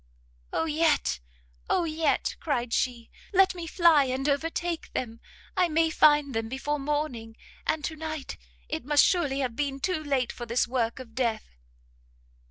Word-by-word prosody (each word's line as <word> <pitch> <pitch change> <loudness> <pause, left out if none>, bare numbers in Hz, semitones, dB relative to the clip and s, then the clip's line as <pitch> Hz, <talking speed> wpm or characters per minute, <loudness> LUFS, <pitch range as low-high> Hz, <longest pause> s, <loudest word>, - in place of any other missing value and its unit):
"Oh - - 0
yet, 310 - +1 0.5
oh 355 - +2
yet," 315 -2 0
cried 245 -7 -1
she, 240 -2 -1 0.2
"let 380 0 +5
me 345 -2 -6
fly 325 -4 +5
and 260 +2 -2
overtake 330 +3 -1
them! 230 -2 -4 0.4
I 365 -2 +3
may 325 +1 +2
find 295 -3 +4
them 225 0 -2
before 290 +3 -2
morning, 275 -6 -3 0.3
and 315 - 0
to 320 - -3
night 310 -2 -5 0.3
it - - -4
must 290 +2 +5
surely 290 -7 +1
have 250 -3 -2
been 275 -1 -2
too 340 +1 -1
late 270 -4 0
for 240 - -8
this 235 +2 +1
work 235 -2 -1
of 250 -3 -10
death!" 230 - -2
290 Hz, 160 wpm, -27 LUFS, 250-320 Hz, 0.5 s, let